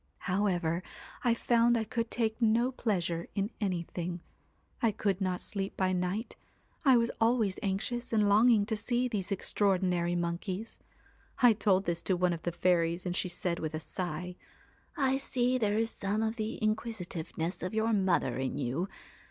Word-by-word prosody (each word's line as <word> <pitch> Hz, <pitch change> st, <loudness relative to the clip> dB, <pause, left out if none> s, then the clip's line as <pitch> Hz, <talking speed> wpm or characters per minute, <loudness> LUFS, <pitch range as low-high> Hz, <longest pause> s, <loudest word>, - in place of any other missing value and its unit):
1 185 Hz, -, 0 dB
However, 175 Hz, -4 st, +1 dB, 0.4 s
I 240 Hz, -2 st, +3 dB
found 235 Hz, 0 st, +3 dB
I 225 Hz, -, 0 dB
could 230 Hz, +1 st, -2 dB
take 225 Hz, 0 st, -1 dB
no 230 Hz, +3 st, +3 dB
pleasure 175 Hz, -9 st, -1 dB
in 200 Hz, +3 st, -1 dB
anything; 175 Hz, -2 st, -2 dB, 0.6 s
I 230 Hz, -, +4 dB
could 200 Hz, -2 st, -1 dB
not 185 Hz, -1 st, -1 dB
sleep 195 Hz, -2 st, -2 dB
by 185 Hz, -1 st, +1 dB
night, 180 Hz, +5 st, -2 dB, 0.5 s
I 265 Hz, -4 st, +6 dB
was 235 Hz, 0 st, +2 dB
always 225 Hz, -4 st, +2 dB
anxious 215 Hz, +5 st, -2 dB
and 215 Hz, -2 st, +3 dB
longing 215 Hz, +1 st, +5 dB
to 220 Hz, +1 st, -1 dB
see 240 Hz, +4 st, 0 dB
these 210 Hz, -5 st, -3 dB
extraordinary 180 Hz, -3 st, +1 dB
monkeys. 180 Hz, +5 st, -3 dB, 0.6 s
I 240 Hz, -2 st, +8 dB
told 200 Hz, -2 st, +2 dB
this 170 Hz, -1 st, -1 dB
to 185 Hz, -, +1 dB
one 180 Hz, 0 st, +2 dB
of 165 Hz, -, -5 dB
the 175 Hz, -, -2 dB
fairies, 170 Hz, 0 st, +1 dB
and 180 Hz, 0 st, -2 dB
she 185 Hz, -, -1 dB
said 175 Hz, 0 st, -2 dB
with 155 Hz, -1 st, -3 dB
a -, -, -2 dB
sigh: 180 Hz, +1 st, -5 dB, 0.3 s
" -, -, -30 dB
I 265 Hz, -, +2 dB
see 255 Hz, -2 st, 0 dB
there 210 Hz, -2 st, +1 dB
is 225 Hz, +1 st, +1 dB
some 205 Hz, +3 st, -1 dB
of 220 Hz, 0 st, -1 dB
the 220 Hz, -1 st, -3 dB
inquisi 215 Hz, -2 st, -1 dB
tiveness 165 Hz, 0 st, -4 dB
of 185 Hz, +4 st, -3 dB
your 220 Hz, +1 st, +2 dB
mother 180 Hz, -, +1 dB
in 130 Hz, 0 st, -2 dB
you. 140 Hz, +10 st, -1 dB
195 Hz, 175 wpm, -31 LUFS, 180-225 Hz, 0.6 s, I